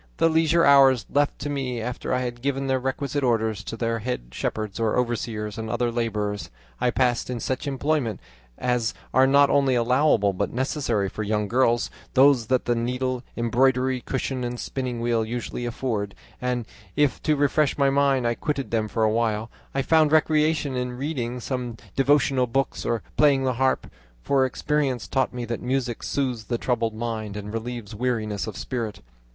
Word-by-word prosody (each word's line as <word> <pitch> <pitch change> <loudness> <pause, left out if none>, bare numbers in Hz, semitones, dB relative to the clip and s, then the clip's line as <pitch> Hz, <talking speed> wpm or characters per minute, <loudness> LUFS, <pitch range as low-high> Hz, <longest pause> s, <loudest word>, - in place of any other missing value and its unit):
The 165 - +4
leisure 160 +1 +3
hours 135 -3 +6
left 145 +1 +2
to 145 - -3
me 130 -4 -2
after 120 +2 -4
I 125 0 +1
had 120 -1 -4
given 135 0 -1
the 130 -1 +1
requisite 135 +2 -2
orders 110 -4 +1
to 115 - -5
the 115 -1 -1
head 110 - -4
shepherds, 110 - -3
overseers, 115 -2 -1
and 110 0 -4
other 120 +1 0
labourers, 105 -3 -2 0.3
I - - +2
passed 125 -1 +1
in 125 -2 -3
such 130 +4 -3
employments 135 -5 -1 0.3
as 125 -3 0 0.2
are 130 +1 +5
not 140 +1 +5
only 135 -2 +3
allowable 120 -4 +3
but 100 +2 -2
necessary 125 -5 0
for 110 - -6
young 105 0 0
girls, 120 +1 +2 0.2
those 130 -4 +5
that 130 0 +1
the 120 - +2
needle, 125 +2 -1 0.2
embroidery 125 +2 +2
cushion, 130 0 -3
and 120 0 -3
spinning 125 -3 -3
wheel 115 -1 +1
usually 120 +1 -4
afford, 110 -5 -3 0.3
and 125 -2 -1 0.3
if 145 -2 +2
to 155 - +2
refresh 145 +1 +2
my 140 -1 +3
mind 140 -2 +2
I 120 - +2
quitted 140 +2 -3
them 110 -2 +1
for 110 +1 -1
a 110 - +3
while, 110 -1 0 0.2
I 135 - +1
found 155 -1 +4
recreation 155 -2 +2
in 125 0 -2
reading 125 -4 -3
some 125 -2 -4 0.2
devotional 135 -2 +3
book 135 +3 0
or 115 -3 0
playing 140 -3 +4
the 130 -1 +1
harp, 130 0 +2 0.4
for 135 -1 +3
experience 135 -3 -1
taught 135 -1 0
me 125 -1 -4
that 115 0 -4
music 125 -2 -1
soothes 125 -5 -2
the 120 - -1
troubled 115 -2 -1
mind 110 -2 -4
and 105 +1 -6
relieves 115 -2 -5
weariness 110 -3 -2
of 105 -3 -6
spirit. 115 -1 -4
125 Hz, 175 wpm, -25 LUFS, 115-135 Hz, 0.4 s, hours